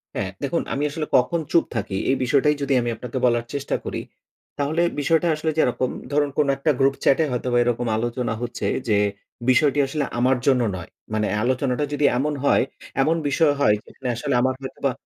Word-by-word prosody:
হ্যা, - - -1 0.2
দেখুন - - 0
আমি 140 - -1
আসলে 150 +1 -3
কখন 165 +7 +1
চুপ 170 - +4
থাকি? 105 -3 -2
এই 135 - +4
বিষয়টাই 145 +4 +3
যদি 140 -1 0
আমি 120 - -2
আপনাকে 125 +2 -6
বলার 120 -1 +2
চেষ্টা 140 -1 -2
করি। - - -3 0.6
তাহলে 150 +4 0 0.2
বিষয়টা 160 +4 +2
আসলে 155 +1 -2
যে 160 - +3
এরকম 125 +1 0 0.2
ধরুন, 145 0 +2
কোন 150 - +3
একটা 150 +2 +2
গ্রুপ 135 0 +3
চ্যাটে 150 +4 +4
হয়তোবা 125 0 0
এরকম 120 0 -1
আলোচনা 120 +1 -2
হচ্ছে 120 -1 -3 0.2
যে, 105 - +3 0.5
বিষয়টি 145 +3 +4
আসলে 145 +1 -2 0.2
আমার 130 +1 +3
জন্য 130 -2 +4
নয়। 90 -1 -8 0.2
মানে 110 -1 +1 0.2
আলোচনাটা 130 +2 0
যদি 145 0 +1
এমন 150 +3 0
হয়, - - +4 0.4
এমন 160 +4 +3
বিষয় 150 0 +3
হয় 105 -7 +4
যেখানে 130 - -8
আসলে 135 +4 -2
আমার 130 +1 +1
হয়তোবা 135 0 -2
135 Hz, 185 wpm, -23 LUFS, 120-145 Hz, 0.6 s, চুপ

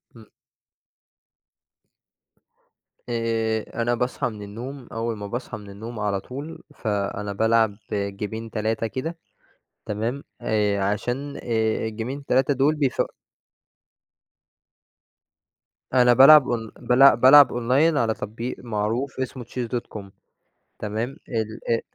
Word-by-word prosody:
إمم. 110 -1 -16 2.8
آآ، 115 -1 -1
أنا 120 +1 +1
باصحَى 125 +2 -1
من 105 -2 -9
النوم 120 +6 -8
أول 115 -1 -3
ما 105 - -6
باصحَى 120 +5 -5
من 105 -1 -12
النوم 110 +3 -8
على 100 -2 0
طول، 140 +10 -8
فأنا 100 -1 -2
بالعب 110 0 +2 0.2
جيمين 105 +3 -4
3 110 +1 -1
كده. 160 +9 -5 0.7
تمام؟ 115 +7 -3 0.2
آآ، 105 -2 +1
عشان 125 +8 -2
آآ 110 -2 -1
الجيمين 120 +6 -5
3 135 +2 +2
دول 140 +4 +3
بيف 140 -4 +1 2.9
أنا 125 -1 +6
بالعب 135 +3 +8
أون 115 -2 -2
بل 130 +1 +6
بالعب 135 +4 +8
أونلاين 130 +7 +2
على 115 -4 +2
تطبيق 115 +4 -5
معروف 115 +4 -2
اسمه 130 -1 -4
chess.com، 120 -3 -5 0.8
تمام، 110 +5 -3
ال 110 -2 -3
آآ 115 - +2
115 Hz, 110 wpm, -24 LUFS, 110-130 Hz, 2.9 s, بالعب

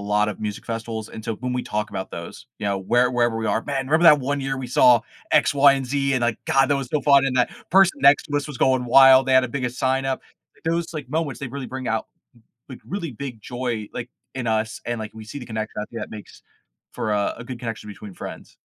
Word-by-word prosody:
lot 105 0 +3
of 105 - -7
music 105 -2 -5
festivals, 115 -1 -5
and 110 - -9
so 115 -2 -2
when 125 +2 -4
we 125 0 -2
talk 105 0 -3
about 95 - -5
those, - - -8
you - - -4
know, 100 -1 0
where 120 +6 +2
wherever 120 -2 +1
we 110 0 -2
are, 110 - +1
"Man, 135 0 -3
remember 160 +4 +3
that 150 -3 +8
one 140 +2 -1
year 135 0 -2
we 130 -2 -5
saw 120 -1 +5 0.3
X, - - +4
Y, 140 0 +6
and 135 -1 -2
Z, 140 +1 0
and, 125 - 0
like, 120 -2 0
god, 135 -1 +3
that 140 - +3
was 135 -2 -4
so 150 0 0
fun, 140 -2 +5
and 130 -1 -1
that 125 - +3 0.2
person 190 -5 +5
next 140 +1 +6
to 145 - +2
us 145 - -4
was 145 -4 -7
going 130 -1 +2
wild, 135 +1 +7
they 130 - +2
had 130 0 +6
a 130 - -3
big 130 0 -2
a - - -1
sign 130 +2 -1
up," 135 -1 -2 0.4
those, 165 +1 -1
like, 145 -5 -6
moments, 150 -5 -2
they 140 - -3
really 135 +1 -6
bring 130 -1 -5
out, 110 0 -1 0.6
like, 130 - -10
really 170 -8 -4
big 125 -2 -7
joy, 120 -3 -4
like, 120 0 -5 0.2
in 125 -3 -3
us, 110 0 -1
and, 120 -1 -3
like, 110 -1 -6
we 110 -1 -9
see 115 +7 -7
the 125 - -9
connection, 110 -1 -4
I 105 - -3
think 115 - -6
that - - -7
makes 105 -1 -11 0.5
for 105 - -2
a 100 -1 0
a 115 - -8
good 125 0 -7
connection 115 -3 -6
between 105 -1 -10
friends. - - -9
125 Hz, 265 wpm, -23 LUFS, 110-135 Hz, 0.6 s, that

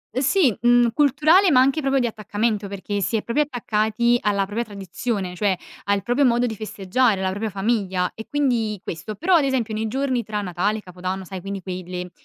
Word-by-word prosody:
Ehm, 260 - +1
sì, 285 - +3
mhmm, 240 0 +4
culturale 305 +7 +4
ma 270 -6 +5
anche 275 +4 +3
proprio 275 -1 +1
di 245 - +1
attaccamento, 215 -1 -2
perché 200 +1 -4
si 210 - 0
è 210 - -3
proprio 235 +6 +1
attaccati 235 -2 0
alla 200 -1 +1
propria 210 +4 -2
tradizione, 200 -1 -4
cioè 195 -1 +1 0.3
al 200 -1 +1
proprio 245 +6 +1
modo 240 -1 +3
di 225 -2 -3
festeggiare 210 +1 0
la 190 0 0
propria 210 +3 -3
famiglia, 195 -3 -1
e 220 - -9
quindi 240 -8 0
questo. 180 +6 -6
Però, 360 - +1
ad 320 - +4
esempio, 255 -5 0
nei 220 +1 -2
giorni 260 +1 -1
tra 210 0 -3
Natale 190 +3 -1
e - - -7
Capodanno, 185 0 -5
sai, 185 0 -7
quindi 195 +1 -5
quei 185 0 -5
le 180 0 -5
215 Hz, 205 wpm, -22 LUFS, 195-245 Hz, 0.3 s, ma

